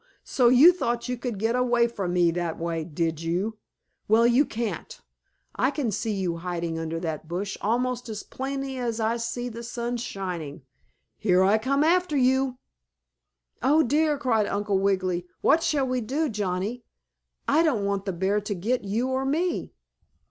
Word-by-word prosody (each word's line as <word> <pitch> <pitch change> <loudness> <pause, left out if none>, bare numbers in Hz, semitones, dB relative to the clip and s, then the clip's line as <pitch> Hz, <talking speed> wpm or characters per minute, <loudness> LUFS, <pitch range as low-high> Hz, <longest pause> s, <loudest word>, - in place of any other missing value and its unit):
So 245 -3 +3
you 280 +9 +8
thought 240 -9 -2
you 250 - -1
could 240 -3 -4
get 225 +4 0
away 245 -1 +3
from 195 -6 -3
me 175 -2 +4
that 170 -1 -2
way, 165 -1 -2
did 165 0 -2
you? 185 +7 -2 0.5
Well, 225 +2 +5
you 245 +5 +4
can't. 230 -1 -4 0.6
I 260 - +2
can 275 -5 -2
see 220 +3 -2
you 185 -4 -1
hiding 170 -1 -3
under 165 0 -3
that 160 -2 -4
bush 190 +4 -3
almost 245 +2 -1
as 215 -1 -5
plainly 270 0 -4
as 235 -2 -2
I 220 0 +1
can 235 - -2
see 240 +1 -3
the 235 -1 -7
sun 240 +1 -3
shining. 180 - -5 0.6
Here 185 -3 +3
I 205 +3 +4
come 275 +5 +1
after 345 -2 +2
you." 260 0 +2 1.0
"Oh, 295 +6 +4
dear!" 300 +3 +2
cried 225 -7 +1
Uncle 205 -1 0
Wiggily. 185 -2 0
"What 330 - +4
shall 300 -5 +1
we 255 -1 -1
do, 280 +7 -1
Johnnie? 205 +3 -2 0.6
I 305 +3 +4
don't 260 -12 +1
want 200 -1 -1
the 195 - -1
bear 190 +4 0
to 205 0 -3
get 225 +7 -1
you 220 +6 -1
or 260 0 0
me." 320 +7 -1
225 Hz, 175 wpm, -26 LUFS, 185-255 Hz, 1.0 s, you